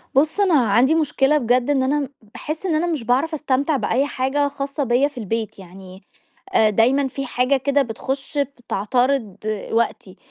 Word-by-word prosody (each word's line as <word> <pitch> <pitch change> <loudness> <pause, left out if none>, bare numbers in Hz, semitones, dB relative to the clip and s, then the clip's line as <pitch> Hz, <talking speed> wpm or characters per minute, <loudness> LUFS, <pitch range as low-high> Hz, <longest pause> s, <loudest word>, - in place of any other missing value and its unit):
بُصّ، 305 +8 +2
أنا 390 -4 +3 0.2
عندي 260 +8 +4
مشكلة 295 -2 +2
بجد، 245 0 +1
إن 275 -2 +2
أنا 280 +1 0 0.2
باحس 315 +5 -6
إن 335 - +1
أنا 330 +3 +1
مش 315 -8 -2
باعرف 265 +8 +1
أستمتع 285 0 0
بأي 265 +2 0
حاجة 285 +2 0
خاصة 280 +1 -4
بيّا 250 +2 +2
في 290 - -14
البيت 220 -2 -4
يعني 190 +1 -13 0.5
آآ، 220 - +4
دايمًا 255 +7 +2
في 275 +1 -5
حاجة 255 +2 +1
كده 280 +2 +1
بتخش 270 +4 -4
بتعترض 250 -4 -1 0.3
وقتي. 225 -4 -1
270 Hz, 165 wpm, -21 LUFS, 240-285 Hz, 0.5 s, عندي